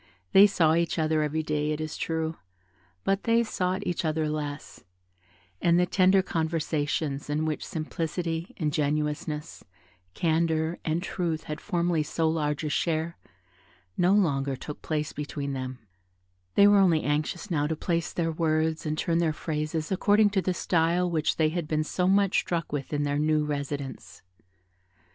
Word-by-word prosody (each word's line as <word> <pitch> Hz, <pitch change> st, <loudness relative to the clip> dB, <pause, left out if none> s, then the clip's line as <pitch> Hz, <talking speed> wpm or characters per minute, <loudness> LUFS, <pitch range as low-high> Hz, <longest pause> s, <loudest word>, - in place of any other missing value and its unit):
They 200 Hz, -, +8 dB
saw 165 Hz, -5 st, +3 dB
each 170 Hz, +1 st, +1 dB
other 155 Hz, -1 st, +2 dB
every 155 Hz, +1 st, -1 dB
day, 150 Hz, 0 st, -1 dB
it 155 Hz, 0 st, -1 dB
is 155 Hz, -1 st, -4 dB
true, 160 Hz, 0 st, -2 dB, 0.7 s
but 195 Hz, 0 st, 0 dB
they 230 Hz, 0 st, +4 dB
sought 190 Hz, -2 st, -2 dB
each 175 Hz, -, -1 dB
other 155 Hz, -1 st, 0 dB
less; 150 Hz, -1 st, -5 dB, 0.8 s
and 170 Hz, 0 st, +4 dB
the 180 Hz, -, +4 dB
tender 190 Hz, +1 st, +4 dB
conversations, 155 Hz, -4 st, -1 dB
in 150 Hz, +2 st, 0 dB
which 155 Hz, -1 st, -2 dB
simplicity, 165 Hz, +1 st, -3 dB
ingenuousness, 150 Hz, 0 st, -2 dB, 0.5 s
candour, 160 Hz, 0 st, +1 dB
and 165 Hz, +2 st, -1 dB
truth 170 Hz, -4 st, -2 dB
had 150 Hz, -, -6 dB
formerly 175 Hz, -4 st, 0 dB
so 160 Hz, +2 st, 0 dB
large 150 Hz, -2 st, -1 dB
a 155 Hz, -, -1 dB
share, 165 Hz, +2 st, -1 dB, 0.8 s
no 180 Hz, +2 st, +3 dB
longer 140 Hz, -9 st, +2 dB
took 150 Hz, +3 st, -8 dB
place 150 Hz, -1 st, -2 dB
between 145 Hz, -1 st, -4 dB
them; 130 Hz, -1 st, -4 dB, 0.8 s
they 200 Hz, -, +7 dB
were 205 Hz, 0 st, +6 dB
only 170 Hz, -5 st, +4 dB
anxious 155 Hz, +6 st, -2 dB
now 150 Hz, -3 st, +1 dB
to 160 Hz, -, -1 dB
place 170 Hz, +1 st, -1 dB
their 165 Hz, -1 st, -1 dB
words 160 Hz, 0 st, 0 dB
and 155 Hz, 0 st, -1 dB
turn 165 Hz, +1 st, +1 dB
their 165 Hz, -2 st, +2 dB
phrases 155 Hz, +1 st, -3 dB
according 205 Hz, +2 st, +4 dB
to 195 Hz, -1 st, +1 dB
the 185 Hz, -, 0 dB
style 175 Hz, +1 st, +1 dB
which 160 Hz, -2 st, +1 dB
they 155 Hz, -1 st, +2 dB
had 170 Hz, -1 st, -3 dB
been 155 Hz, 0 st, 0 dB
so 180 Hz, +3 st, -1 dB
much 195 Hz, 0 st, +3 dB
struck 170 Hz, -2 st, -2 dB
with 145 Hz, -2 st, -4 dB
in 145 Hz, -1 st, 0 dB
their 145 Hz, 0 st, 0 dB
new 155 Hz, 0 st, +2 dB
residence. 140 Hz, -2 st, -5 dB
160 Hz, 160 wpm, -27 LUFS, 150-175 Hz, 0.8 s, They